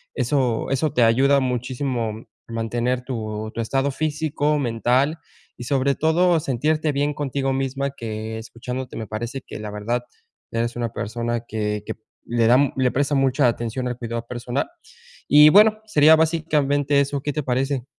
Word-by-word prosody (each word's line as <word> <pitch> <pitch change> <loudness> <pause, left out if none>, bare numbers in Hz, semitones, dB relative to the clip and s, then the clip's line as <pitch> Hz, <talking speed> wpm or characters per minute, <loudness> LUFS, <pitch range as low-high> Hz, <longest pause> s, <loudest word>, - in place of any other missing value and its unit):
eso 125 -3 0
eso 150 +3 +1
te 125 - +3
ayuda 135 +5 +4
muchísimo 125 -3 -2 0.2
a - - -9
mantener 120 +2 -1
tu 110 -4 -5
tu 115 - -3
estado 135 +5 0
físico, 150 0 -1
mental 130 +5 +1 0.4
y - - -5
sobre 140 +1 +1
todo 170 +2 +3
sentirte 150 +3 0
bien 145 +1 0
contigo 135 -2 -2
misma 135 +1 -1
que 110 -3 -5
escuchándote 125 +3 -6
me 110 - -5
parece 120 +6 -5
que - - -8
la 105 -1 -6
verdad 115 +4 -2 0.5
eres 115 +1 -2
una 120 -1 -2
persona 115 +2 -3
que 105 -1 -2
que - - -4 0.3
le 120 -1 +1
da, 125 - +6 0.2
le 130 -1 +2
presta 145 +2 0
mucha 135 -1 +3
atención 120 +2 -2
al 125 -1 -4
cuidado 115 -1 -5
personal. 125 +2 -3 0.6
Y 150 +1 +8
bueno, 215 +4 +6
sería 155 -5 +6
básicamente 150 -3 +1
eso, 140 0 -1
¿qué 145 - -2
te 150 - -2
parece? 130 0 -1
130 Hz, 160 wpm, -22 LUFS, 115-145 Hz, 0.6 s, Y